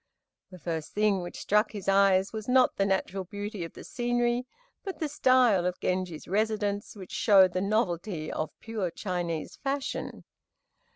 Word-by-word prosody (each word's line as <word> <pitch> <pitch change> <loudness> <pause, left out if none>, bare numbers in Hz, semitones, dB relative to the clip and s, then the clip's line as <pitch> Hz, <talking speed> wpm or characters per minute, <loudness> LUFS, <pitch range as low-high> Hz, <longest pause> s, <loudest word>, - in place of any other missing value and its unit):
The 185 - -11
first 160 -2 -4
thing 210 -2 +2
which 175 - -7
struck 210 +2 +2
his 205 -3 -7
eyes 195 0 +4
was, 220 -1 -5
not 255 0 +4
the 195 - +1
natural 190 0 -1
beauty 205 +1 -5
of 165 - -7
the - - -10
scenery, 240 0 0 0.4
but 385 -2 -5
the 315 - -1
style 255 -9 +4
of 180 - -3
Genji's 180 -3 -2
residence, 205 +1 -1
which 190 -3 -10
showed 190 -4 +5
the 185 - 0
novelty 185 -5 -1
of 155 - -2
pure 215 -5 -2
Chinese 175 -3 -4
fashion. 275 -1 -3
200 Hz, 160 wpm, -28 LUFS, 180-225 Hz, 0.4 s, showed